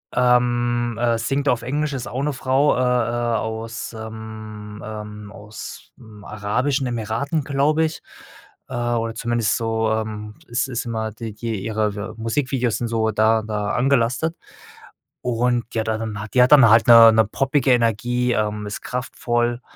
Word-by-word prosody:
Ähm, 120 -1 +2
äh, 120 -1 +1
singt 135 +5 -1
auf 120 - +1
Englisch, 150 +2 -2
ist 125 -3 -4
auch 130 +3 -3
'ne 150 0 0
Frau, 135 +2 +2
äh, - - -1
äh, 120 -2 +1
aus, 110 +1 -5
ähm, 110 -1 -8
ähm 105 -1 -8
ausm 105 +1 -11
arabischen 125 +7 -1
Emiraten, 120 +6 -2
glaube 145 +3 +1
ich, 160 - -5 0.7
äh, - - -8
oder 120 -2 -1
zumindest 115 -1 0
so, 110 -1 0
ähm, 110 -1 -3
ist 120 +2 -1
ist 125 -2 -3
immer 110 -2 -3
die 110 0 -7
die 110 -3 -4
ihre 110 -1 -2
Musikvideos 125 +1 -1
sind 120 - -2
so 110 -1 0
da 110 +1 +2
da 105 -1 -2
angelastet. 130 +5 +1 0.9
Und, 120 0 0
ja, 110 - +1
da 110 0 -1
dann 110 -2 -4
hat 105 - -9
die 125 - +5
hat 125 - +2
dann 135 -6 +8
halt 110 +3 +5
'ne 115 -1 +9
'ne 110 0 +4
poppige 135 +4 +1
Energie, 120 +1 +1
ähm, 105 -1 -1
ist 105 - -5
kraftvoll. 120 -1 -2
115 Hz, 160 wpm, -22 LUFS, 110-125 Hz, 0.9 s, ne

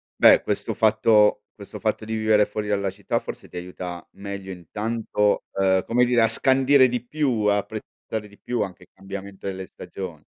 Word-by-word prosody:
beh. - - +7
Questo - - -2
fatto 110 -1 +4
questo 100 -2 -10
fatto 110 0 -1
di 110 - -3
vivere 110 -1 +3
fuori 105 0 -4
dalla 100 -1 0
città 100 +1 -2
forse - - -8
ti - - -9
aiuta 90 -1 -6
meglio 100 -1 -7
intanto, 105 +3 -1 0.2
ehm, 95 -1 +3
come 125 +2 +3
dire 120 -1 +3
a 115 - +5
scandire 130 +2 +4
di 125 -1 -3
più, 130 -6 0
a 105 0 +4
apprezzare 105 +1 -6
di 100 - -18
più 120 -2 -2
anche 90 -3 -5
il - - -21
cambiamento 100 0 -9
delle 95 -1 -4
stagion 85 -4 -8
105 Hz, 180 wpm, -24 LUFS, 95-115 Hz, 0.2 s, beh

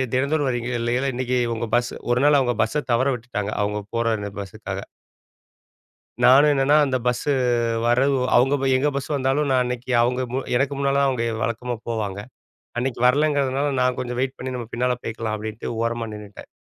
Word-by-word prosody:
தினந்தோறும் 140 +1 +1
வரீங்க 120 -1 -2
இல்லேங்களா?' 125 +3 0
இன்னக்கி 125 0 -1 0.2
உங்க 115 +1 -3
பஸ் 120 0 -1 0.2
ஒரு 120 +1 +2
நாள் 145 -1 +5
அவுங்க 120 -2 0
பஸ்ஸ 150 +7 -2
தவற 130 +3 +2
விட்டுட்டாங்க. 110 -4 -4
அவுங்க 105 0 -2
போற 115 0 +1
அந்த 100 0 -4
பஸ்ஸுக்காக. 95 -2 -6 1.4
நானும் 140 +4 +7
என்னன்னா 135 +2 +3
அந்த 130 -2 0
பஸ்ஸு 125 +4 0 0.5
வரவு 130 +4 +3 0.2
அவுங்க 135 +3 +4
போய் 135 -1 +2
எங்க 145 +3 +1
பஸ் 140 - -3
வந்தாலும் 140 +1 +1
நான் 130 -1 +3
அன்னைக்கு 125 +1 -4
அவங்க 125 +2 +1
மு 130 - 0 0.2
எனக்கு 135 +3 +1
முன்னால 140 0 +1
தான் 140 - +3
அவங்க 125 -3 -1 0.2
வழக்கமா 120 +1 -2
போவாங்க. 105 -4 -3 0.6
அன்னைக்கு 125 0 -2
வரலங்கிறதுனால 140 0 +2
நான் 125 0 +2
கொஞ்சம் 125 -1 -4
வெயிட் 130 +1 -1
பண்ணி, 130 +1 -5
"நம்ம 120 -2 -5
பின்னால 125 +1 +1
போய்க்கலாம்." 110 -1 -3
அப்படீன்ட்டு 110 +1 -6
ஓரமா 115 0 -1
நின்னுட்டேன். 105 -1 -10
125 Hz, 175 wpm, -23 LUFS, 115-135 Hz, 1.4 s, நானும்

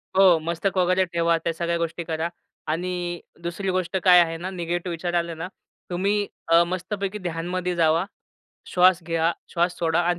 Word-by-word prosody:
हो, 185 -4 +6
मस्तक 170 +4 -2
वगैरे 185 +1 +3
ठेवा, 170 -1 +1
त्या 165 0 -2
सगळ्या 170 +1 -1
गोष्टी 170 +1 -3
करा 160 +1 -2 0.4
आणि 175 +1 -2 0.2
दुसरी 180 +3 -3
गोष्ट 185 0 -1
काय 180 -1 +8
आहे 165 -1 +2
ना, 180 +3 -5
निगेटिव्ह 175 -1 -3
विचार 175 +1 -3
आले 170 -1 0
ना, 165 +3 -5 0.4
तुम्ही 200 +3 0 0.2
अ, 170 +1 +6
मस्तपैकी 190 +3 -3
ध्यानमध्ये 175 +2 -2
जावा. 165 +2 +3 0.6
श्वास 180 -1 +4
घ्या, 165 0 +1 0.2
श्वास 175 0 0
सोडा 165 0 +2
अन् 175 0 +1
175 Hz, 165 wpm, -24 LUFS, 170-185 Hz, 0.6 s, काय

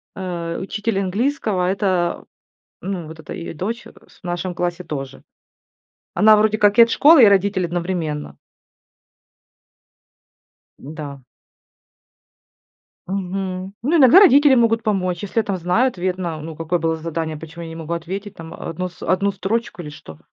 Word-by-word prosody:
э, 170 -3 -4
учитель 200 +1 -2
английского- 200 -1 -1
это, 185 -4 0 0.6
ну, 180 -4 -4
вот 160 0 -11
эта 160 - -8
её 170 -3 -6
дочь, 210 +9 -4
э, - - -14 0.2
с - - -22
в - - -64
нашем 175 +1 -3
классе 175 0 -2
тоже. 135 -4 -7 0.9
Она 215 +4 +6
вроде 215 0 +2
как 205 +1 +3
и - - +12
от 230 - 0
школы, 295 +1 +6
и - - +10
родители 200 -1 +2
одновременно. 170 -3 -3 2.4
Да. 145 -1 -8 1.9
Мгм. 190 0 -4
Ну, 300 +8 +2
иногда 270 +6 +8
родители 290 -7 +6
могут 230 -2 +2
помочь, 185 -4 -1
если 200 - -7
тебя 225 - +3
там 195 -3 -2
знают, 185 +7 +1
верно, 180 -3 -3
ну, 160 +1 -8
какое 165 +2 -1
было 165 0 0
задание, 160 -1 -4
почему 165 +2 -9
я 165 - -7
не 165 - -8
могу 165 0 -5
ответить 190 +5 -5
там, 165 0 -10
э, - - -11
1 180 +3 -5
с 175 - -21
1 195 +2 +1
строчку 200 +1 -3
или 150 - -8
что? 80 - -12
185 Hz, 155 wpm, -20 LUFS, 165-205 Hz, 2.4 s, и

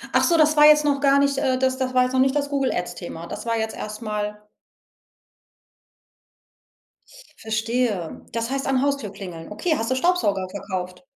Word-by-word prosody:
Ach - - +4
so, 335 -1 +3
das 310 0 +4
war 295 0 +7
jetzt 300 0 +6
noch 280 -1 +1
gar 275 0 +4
nicht 280 -1 +2
äh, 255 -2 +1
das 260 0 +1
das 255 -1 -2
war 250 - +5
jetzt 250 +1 -2
noch 260 - +2
nicht 265 +2 +3
das 285 -1 0
Google 275 -2 0
Ads-Thema. 175 -1 -5
Das 215 +6 -7
war 230 0 +1
jetzt 220 0 -3
erstmal 210 -1 -5 2.9
Verstehe. 220 -4 -2
Das 230 +2 -3
heißt 275 0 -2
an 265 -1 +2
Haustür 280 -8 -1
klingeln. 180 -3 -9
Okay, 315 +10 -1
hast 225 +2 -2
du - - +2
Staubsauger 260 - +1
verkauft? 185 0 -6
250 Hz, 175 wpm, -23 LUFS, 210-275 Hz, 2.9 s, war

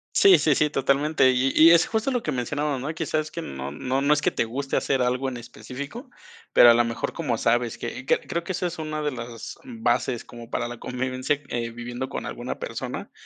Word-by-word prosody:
Sí, 395 -1 +7
sí, 150 -3 +3
sí, 150 +2 +2
totalmente. 140 +1 +3
Y 130 +1 +2
y 160 +1 +8
es 170 0 +6
justo 220 +3 -1
lo 245 -2 -1
que 150 - -1
mencionábamos, 145 +2 -2
¿no? 150 +4 -3
Que - - -3
sabes 155 0 -1
que 170 - -6
no 65 0 -6
no 130 - -2
no 145 +2 +4
es 150 - 0
que - - +2
te - - 0
guste 135 +4 -3
hacer 135 -2 +1
algo 125 +2 0
en 125 - -6
específico, 140 - -8 0.4
pero 120 - +8
a - - +6
la 120 +1 +4
mejor, 115 0 -3
como 135 -9 -1
sabes 120 0 +1
que 130 - -6
que - - +3
creo 170 - -3
que 185 - -4
esa 180 - -2
es 175 -1 -4
una 155 -1 -3
de 150 - 0
las 120 -2 -7
bases 225 - -1
como 120 -1 -11
para 120 - -2
la 120 -1 -8
convivencia, 130 +2 -2
eh, 120 -1 -2
viviendo 120 +2 -6
con - - -5
alguna - - -5
persona, - - -5
135 Hz, 230 wpm, -25 LUFS, 120-155 Hz, 0.4 s, y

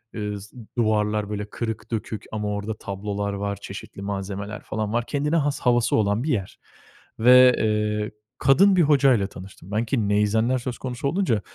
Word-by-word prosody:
ııı, 105 -1 -4
s 105 +5 -14 0.2
duvarlar 105 -2 +1
böyle 105 -1 -3
kırık, 110 0 -5
dökük 110 -1 -4
ama 105 -1 -3
orda 105 +1 -3
tablolar 100 0 -4
var, 100 0 -2
çeşitli 100 0 -9
malzemeler 100 +1 -4
falan 110 0 -3
var. 120 0 0
Kendine 150 +4 -1
has 145 -3 +1
havası 120 -1 +2
olan 105 +2 +1
bir 155 - -2
yer 100 -7 -3 0.6
ve, 125 +2 +7 0.5
ııı, 105 - -6 0.3
kadın 185 +9 +5
bir 180 - +4
hocayla 135 -8 +4
tanıştım 95 -1 -12
ben. 110 +3 0
Ki 110 -3 0
neyzenler 110 +4 +2
söz 125 0 -5
konusu 125 +1 -4
olunca 150 - +1
110 Hz, 165 wpm, -24 LUFS, 100-125 Hz, 0.6 s, ve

